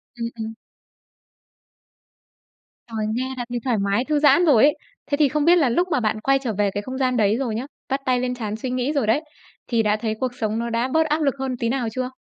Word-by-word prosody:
Ừm, 230 Hz, -1 st, -3 dB
ừm. 220 Hz, 0 st, -4 dB, 2.3 s
Trời, 220 Hz, -2 st, -3 dB
nghe 260 Hz, +1 st, -2 dB
đã 245 Hz, -, -3 dB
thấy 240 Hz, 0 st, -2 dB
thoải 245 Hz, -4 st, +1 dB
mái, 200 Hz, +5 st, 0 dB
thư 300 Hz, -1 st, +1 dB
giãn 300 Hz, +4 st, +5 dB
rồi 270 Hz, -7 st, +5 dB
ấy. 295 Hz, 0 st, +5 dB, 0.4 s
Thế 285 Hz, -, +2 dB
thì 295 Hz, -3 st, +4 dB
không 300 Hz, +1 st, 0 dB
biết 345 Hz, +1 st, +7 dB
là 290 Hz, -8 st, +3 dB
lúc 350 Hz, +10 st, +1 dB
mà 255 Hz, -, +2 dB
bạn 215 Hz, -1 st, 0 dB
quay 270 Hz, +2 st, +3 dB
trở 240 Hz, -5 st, -3 dB
về 205 Hz, -1 st, +2 dB
cái 205 Hz, -, -3 dB
không 260 Hz, 0 st, -6 dB
gian 255 Hz, -2 st, +1 dB
đấy 210 Hz, 0 st, +3 dB
rồi 240 Hz, -5 st, -2 dB
nhá, 245 Hz, +4 st, -3 dB, 0.2 s
vắt 270 Hz, +1 st, -1 dB
tay 250 Hz, -1 st, +2 dB
lên 250 Hz, 0 st, -2 dB
trán 215 Hz, -3 st, -4 dB
suy 250 Hz, +3 st, -4 dB
nghĩ 255 Hz, +4 st, -1 dB
rồi 275 Hz, -7 st, 0 dB
đấy, 255 Hz, +8 st, +3 dB, 0.5 s
thì 230 Hz, -2 st, +1 dB
đã 210 Hz, 0 st, +2 dB
thấy 220 Hz, -1 st, -2 dB
cuộc 255 Hz, -1 st, -1 dB
sống 220 Hz, -2 st, -2 dB
nó 235 Hz, 0 st, -2 dB
đã 235 Hz, +2 st, 0 dB
bớt 320 Hz, 0 st, +3 dB
áp 305 Hz, +1 st, 0 dB
lực 275 Hz, -2 st, +1 dB
hơn 260 Hz, -2 st, -2 dB
tí 230 Hz, -1 st, -1 dB
nào 250 Hz, -2 st, -1 dB
chưa? 255 Hz, 0 st, -2 dB
250 Hz, 250 wpm, -22 LUFS, 225-275 Hz, 2.3 s, biết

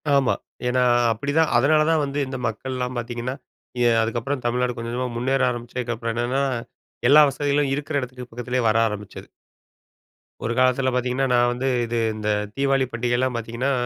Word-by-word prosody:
ஆமா. 135 Hz, -2 st, +3 dB, 0.3 s
ஏன்னா 125 Hz, 0 st, +2 dB, 0.3 s
அப்படிதான். 145 Hz, +7 st, +1 dB
அதனால 155 Hz, +5 st, +4 dB
தான் 160 Hz, -2 st, +3 dB
வந்து 140 Hz, +1 st, -3 dB
இந்த 135 Hz, 0 st, -5 dB
மக்கள்லாம் 125 Hz, +2 st, -4 dB
பாத்தீங்கன்னா, 120 Hz, +2 st, -4 dB, 0.5 s
எ -, -, +5 dB
அதுக்கப்புறம் 125 Hz, +4 st, -2 dB
தமிழ்நாடு 125 Hz, 0 st, 0 dB
கொஞ்ச 115 Hz, 0 st, -5 dB
கொஞ்சமா 125 Hz, +1 st, -2 dB
முன்னேற 135 Hz, +2 st, +1 dB
ஆரம்பிச்சதுக்கப்புறம் 120 Hz, -1 st, -4 dB
என்னன்னா, 125 Hz, +3 st, 0 dB, 0.7 s
எல்லா 150 Hz, +2 st, +9 dB
வசதிகளும் 145 Hz, 0 st, 0 dB
இருக்கிற 145 Hz, +1 st, -1 dB
இடத்துக்கு 125 Hz, 0 st, -8 dB
பக்கத்திலயே 125 Hz, +1 st, -2 dB
வர 110 Hz, -, +2 dB
ஆரம்பிச்சது. 105 Hz, -2 st, -7 dB, 1.1 s
ஒரு 115 Hz, -, -1 dB
காலத்தில 130 Hz, +1 st, +3 dB
பாத்தீங்கன்னா, 125 Hz, +2 st, 0 dB
நான் 120 Hz, 0 st, +4 dB
வந்து 130 Hz, +2 st, -2 dB, 0.2 s
இது 120 Hz, +1 st, -3 dB, 0.2 s
இந்த 105 Hz, -1 st, -4 dB, 0.3 s
தீபாவளி 135 Hz, -1 st, +2 dB
பண்டிகைலாம் 120 Hz, +2 st, 0 dB
பாத்தீங்கன்னா, 115 Hz, +4 st, -2 dB
125 Hz, 145 wpm, -23 LUFS, 120-135 Hz, 1.1 s, எல்லா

